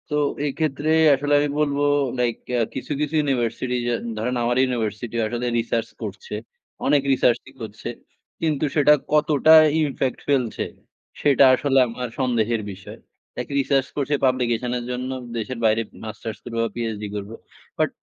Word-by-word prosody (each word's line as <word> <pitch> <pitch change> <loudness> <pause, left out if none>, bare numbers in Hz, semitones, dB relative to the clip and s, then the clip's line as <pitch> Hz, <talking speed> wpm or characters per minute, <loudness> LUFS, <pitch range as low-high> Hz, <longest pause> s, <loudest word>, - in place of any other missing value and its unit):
তো, 150 - -1 0.3
এক্ষেত্রে 145 +1 -1 0.3
আসলে 145 +2 -1
আমি 145 0 +1
বলবো 145 -1 +1 0.4
লাইক 120 -2 +1 0.2
অ্যা 120 - +2 0.2
কিছু, - - -6
কিছু 150 +1 -1
ইউনিভার্সিটি, 125 -3 -1
যা 120 - +1 0.2
ধরেন 125 +4 -1
আমার 120 +1 +1
ইউনিভার্সিটি 120 -2 -2
আসলে 120 +2 -3
research 115 0 -1
করছে। 475 - -7 0.5
অনেক 145 -1 +4
research 125 -2 +3
ই - - -16
করছে। 110 +1 -6 0.5
কিন্তু 155 -2 +1
সেটা 150 -1 +6 0.2
কতটা 150 0 +5 0.3
impact 135 -3 -1
ফেলছে। 130 -5 +1 0.6
সেটা 140 -1 +5
আসলে 135 0 +2
আমার 125 +2 -5
সন্দেহের 120 -3 +1
বিষয়। 95 0 -11 0.4
লাইক - - -4
research 135 -1 +1
করছে 145 0 +1
publication 125 -2 +1
এর 120 - -5
জন্য। 125 +1 -3 0.3
দেশের 115 +2 -4
বাইরে 110 +1 +3 0.2
মাস্টার্স 110 0 -6
করব 115 - -7
বা 115 - -1
PhD 110 -3 -3
করব। 100 0 -5 0.5
বাট - - +2
125 Hz, 150 wpm, -23 LUFS, 115-140 Hz, 0.6 s, সেটা